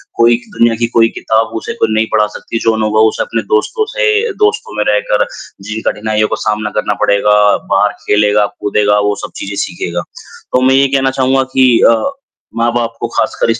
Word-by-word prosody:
कोई 115 0 +4 0.2
दुनिया 115 -1 +3
की 115 - +1
कोई 115 -1 +3
किताब 115 +1 -1
उसे - - -5
खुद 115 - 0
नहीं 110 +1 +2
पढ़ा 105 -1 +2
सकती, 115 +2 -6
जो 115 - +1
अनुभव 110 0 +2
उसे - - -3
अपने - - -3
दोस्तों 440 0 +1
से 450 -2 +1
दोस्तों 460 +3 0
में - - +1
रहकर - - +1 0.4
जिन 110 +1 -5
कठिनाइयों 110 0 -1
को - - -2
सामना 105 0 -2
करना 105 -1 0
पड़ेगा, 105 0 +3
बाहर 105 +1 +3
खेलेगा, 105 0 +3
कूदेगा 105 0 +1
वो 105 0 0
सब - - -11
चीज़ें 100 0 -6
सीखेगा। 85 0 -4 0.5
तो 125 - +3
मैं 130 +1 +3
ये 135 0 +4
कहना 135 0 +1
चाहूँगा 130 0 +1
कि 130 -1 +5 0.2
अ, 115 - +5 0.6
माँ-बाप 115 0 0
को - - -2
खासकर - - -1
इस 115 +1 0
115 Hz, 190 wpm, -13 LUFS, 105-130 Hz, 0.6 s, कि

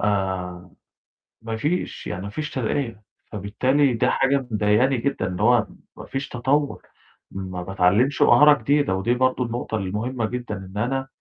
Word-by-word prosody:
آآ، 95 -3 -2 0.7
ما 115 0 -4
فيش، 150 +10 -2
يعني 90 +1 -4
ما 100 - -5
فيش 155 +9 -4
ترقية، 115 -3 -2 0.3
فبالتالي 125 +7 +1
ده 125 +2 +1
حاجة 135 -1 +1
مضايقاني 110 +5 +2
جدًا، 135 +4 -1
إن 90 -1 -5
هو 115 +1 +4 0.3
ما - - -9
فيش 135 +1 -4
تطوّر، 140 +4 0 0.5
ما 95 -2 -5
باتعلّمش 95 +9 +2
مهارة 145 +4 +7
جديدة. 145 -8 +2
ودي 95 +6 +1
برضه 130 0 +1
النقطة 115 -1 -3
المهمة 110 +5 -2
جدًا، 120 -1 -4
إن 95 +1 -10
أنا 135 +4 -1
115 Hz, 150 wpm, -23 LUFS, 100-135 Hz, 0.7 s, مهارة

